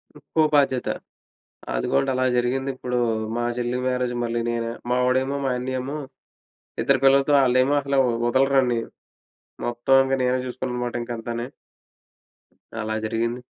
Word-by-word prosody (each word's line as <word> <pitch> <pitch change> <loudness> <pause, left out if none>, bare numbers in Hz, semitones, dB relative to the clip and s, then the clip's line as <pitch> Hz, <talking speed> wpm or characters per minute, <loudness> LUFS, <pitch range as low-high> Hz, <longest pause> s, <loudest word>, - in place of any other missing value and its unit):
ఇంకో 150 +2 -2
బాధ్యత. 135 -3 +2 0.9
అదుగోండలా 70 - +1
జరిగింది. 130 +2 0
ఇప్పుడూ 125 -1 -2 0.4
మా 120 - -1
చెల్లి 120 0 -1
మ్యారేజ్‌కి 125 -1 -1
మళ్ళీ 120 0 -1
నేనే. 115 0 -2 0.2
మా 125 - +2
వాడేమో 130 +2 +1
మా 135 - +1
అన్నియేమో 130 +3 -3 0.8
ఇద్దరు 135 -2 +3
పిల్లలతో, 135 +1 +5
ఆళ్ళేమో 130 +2 +3
అసలూ 140 0 +1 0.3
ఒదలరండి. 130 -2 +3 0.9
మొత్తం 120 +2 +2
ఇంక 135 - -1
నేనే 125 +1 +1
జూసుకున్నానమాట 125 -1 -4
ఇంక 120 0 -6
అంతాని. 120 +1 -4 1.3
అలా 110 0 -2
జరిగింది. 115 +2 -2
125 Hz, 120 wpm, -23 LUFS, 120-135 Hz, 1.3 s, పిల్లలతో